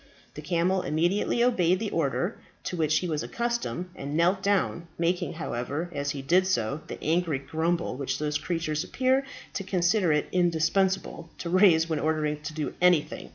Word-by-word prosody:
The 150 - -8
camel 180 +3 +1
immediately 175 +10 +1
obeyed 185 -8 +3
the 210 +1 -3
order 165 - -1 0.2
to - - -3
which 155 -2 +2
he 180 - -1
was 155 -3 -1
accustomed, 235 -7 -3
and 140 +2 -4
knelt 180 +3 +3
down, 190 -4 0
making, 175 +1 0
however, 155 +1 -4
as 145 0 -2
he 140 -1 -4
did 180 +7 +3
so, 140 -3 0
the - - -6
angry 165 -1 +1
grumble 165 +4 -1
which 135 0 -2
those 150 0 -1
creatures 160 -3 -2
appear 260 +1 +1 0.3
to 195 - -3
consider 185 0 +2
it 150 -1 +1
indispensable 175 +1 +1
to 170 - -5
raise 175 -4 +5
when 160 -2 -1
ordered 150 -1 -1
to 155 - -4
do 155 -2 -3
anything. 180 -4 +2
170 Hz, 170 wpm, -27 LUFS, 150-185 Hz, 0.3 s, raise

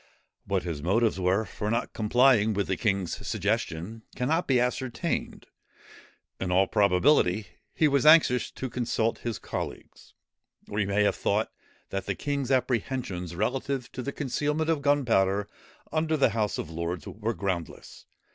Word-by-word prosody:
What 95 -2 0
his 80 -5 -4
motives 105 +5 +1
were 95 +4 +1
for 105 +2 -4
not 115 +2 -1
complying 110 -1 +3
with 100 0 0
the 95 - -1
king's 100 -5 -1
suggestion, 105 0 -2
cannot 160 +8 0
be 130 -2 +3
ascertained. 125 0 -2 0.9
In 95 - -2
all 95 +2 +4
probability 100 0 +3 0.3
he 155 - +4
was 140 -2 +2
anxious 150 -6 +6
to 130 - -5
consult 115 -1 -1
his 120 -2 -3
colleagues, - - -7 0.5
or 105 - -3
he 100 - +1
may 100 +1 +2
have 100 - +2
thought - - 0 0.4
that 95 -1 -3
the - - -1
king's 140 -3 -2
apprehensions 120 -9 -1
relative 130 +5 -2
to - - -5
the 140 - -3
concealment 150 +4 -1
of 155 -3 0
gunpowder 110 -9 +2 0.4
under 155 0 +1
the 140 - +4
House 110 -2 -1
of 80 - -5
Lords 85 0 -4
were 110 +1 -3
groundless. 95 -4 -5
110 Hz, 150 wpm, -27 LUFS, 95-130 Hz, 0.9 s, anxious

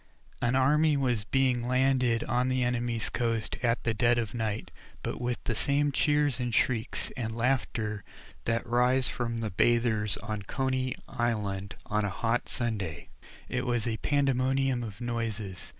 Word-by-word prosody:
An 120 +2 +2
army 150 +3 +4
was 125 -6 0
being 125 0 +1
landed 130 -2 +2
on 125 +2 +1
an 130 - +1
enemy's 120 -2 0
coast 115 -3 -1
at 115 -1 +1
the 115 - +1
dead 120 +2 +3
of 115 -3 -1
night, 110 -2 -3 0.3
but - - -3
with 120 0 -1
the - - -1
same 145 +5 +2
cheers 145 -2 +2
and 120 -2 -1
shrieks 120 -2 +1
and 115 -3 -3
laughter 115 -4 0 0.4
that 115 0 0
rise 125 +2 +3
from 115 -1 -2
the 110 -2 -2
bathers 110 0 +2
at 105 -2 -4
Coney 130 -1 -1
Island 105 -4 -2
on 105 0 0
a 100 - 0
hot 115 +5 -1
Sunday. 105 - -3 0.4
It - - -1
was 120 -1 +1
a 110 -1 -1
pandemonium 135 -1 +1
of 110 -3 -7
noises. 115 -5 -3
120 Hz, 155 wpm, -29 LUFS, 110-130 Hz, 0.4 s, army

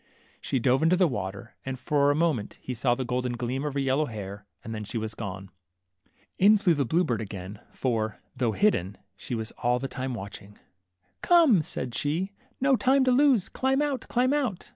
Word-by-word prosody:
She 135 - -1
dove 130 +2 +2
into 165 +3 +4
the 185 0 +4
water, 105 -2 -5
and 135 -1 -4
for 145 +2 +2
a 145 - +3
moment 150 -10 0
he 130 - -5
saw 120 +1 +1
the 130 - -3
golden 125 0 -1
gleam 125 +3 -3
of 145 -2 -3
her - - +1
yellow 135 +3 +1
hair, 100 -2 -7 0.2
and 115 - -6
then 110 -1 -4
she 110 +3 -5
was 110 0 -3
gone. 95 -3 -7 0.9
In 210 +3 +7
flew 195 -4 +3
the 145 -3 0
blue 170 +6 +2
bird 120 -8 -1
again, 100 -1 -7
for, 110 -4 -2 0.2
though 120 -3 0
hidden, 105 - +1 0.2
she 120 - -5
was 110 0 -4
all 125 0 +2
the 135 +2 -3
time 130 -1 -4
watching. 100 -1 -9 0.6
Come," 325 - +5
said 130 -4 -5
she, 165 +10 -1 0.3
no 270 0 +4
time 265 +2 +3
to 255 - +3
lose; 255 -6 +4
climb 265 +1 0
out, 290 -3 -1
climb 255 +3 +2
out 250 -11 -2
130 Hz, 200 wpm, -27 LUFS, 110-185 Hz, 0.9 s, In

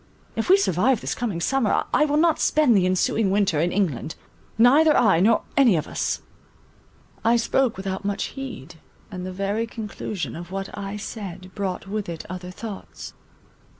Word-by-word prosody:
If 225 - -2
we 380 - +8
survive 245 - +2
this - - -3
coming 220 -8 -3
summer, 250 +5 +1
I 300 - +4
will 295 0 +1
not 325 0 +3
spend 300 -7 +3
the 185 -2 +3
ensuing 190 +3 +1
winter 195 -6 +2
in 170 +3 +1
England; 160 -6 -1 0.4
neither 290 +7 +6
I 195 -8 +4
nor 220 +5 +3
any 250 -8 +5
of 155 -1 -1
us." - - -2 1.0
I 230 +2 +4
spoke 235 0 +1
without 190 0 -4
much 200 +1 -1
heed, 240 - -8 0.3
and 185 -1 -5
the - - -5
very 200 +4 -2
conclusion 215 -4 -5
of 170 +2 -8
what 195 +1 -5
I 200 0 -5
said 190 -4 -7
brought 195 -3 -3
with 205 -1 -3
it 165 -2 -6
other 180 0 -6
thoughts. 200 +2 -8
200 Hz, 170 wpm, -24 LUFS, 185-235 Hz, 1.0 s, we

